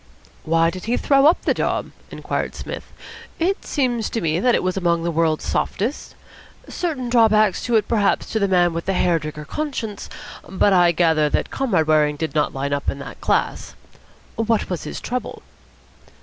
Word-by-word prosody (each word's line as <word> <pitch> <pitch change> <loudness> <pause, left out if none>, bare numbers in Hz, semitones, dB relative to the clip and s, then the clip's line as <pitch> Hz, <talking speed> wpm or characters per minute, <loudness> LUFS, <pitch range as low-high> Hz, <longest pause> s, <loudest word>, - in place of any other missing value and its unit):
"Why 165 +1 +3
did 185 0 -8
he 235 +2 0
throw 275 0 +4
up 330 - +3
the - - +2
job?" - - -2 0.2
inquired - - -4
Psmith. - - -7 0.5
"It 370 +4 0
seems 245 -6 -1
to 230 - -2
me 165 -2 0
that 245 +2 +3
it - - 0
was 185 0 -1
among 170 -3 +1
the 170 - -1
World's 160 -1 0
Softest. 235 +9 -2 0.5
Certain 300 -8 -3
drawbacks 215 -4 +3
to 240 - +1
it, 215 -2 +2
perhaps, 210 -4 +1
to 220 - 0
the 200 - +2
man 175 -2 +3
with 165 0 -5
the 195 - +1
Hair 175 -2 +2
Trigger 150 0 -7
Conscience; 230 - -4 0.4
but 190 +2 +2
I 175 -2 +5
gather 160 -3 +2
that - - -1
Comrade 205 -12 +1
Waring 150 -1 +3
did 160 +2 -4
not 150 - +1
line 140 +1 -3
up 140 - -1
in - - -3
that 140 - -9
class. - - -1 0.6
What 225 -3 0
was 180 - -3
his - - -5
trouble?" 250 0 -5
185 Hz, 185 wpm, -21 LUFS, 165-230 Hz, 0.6 s, I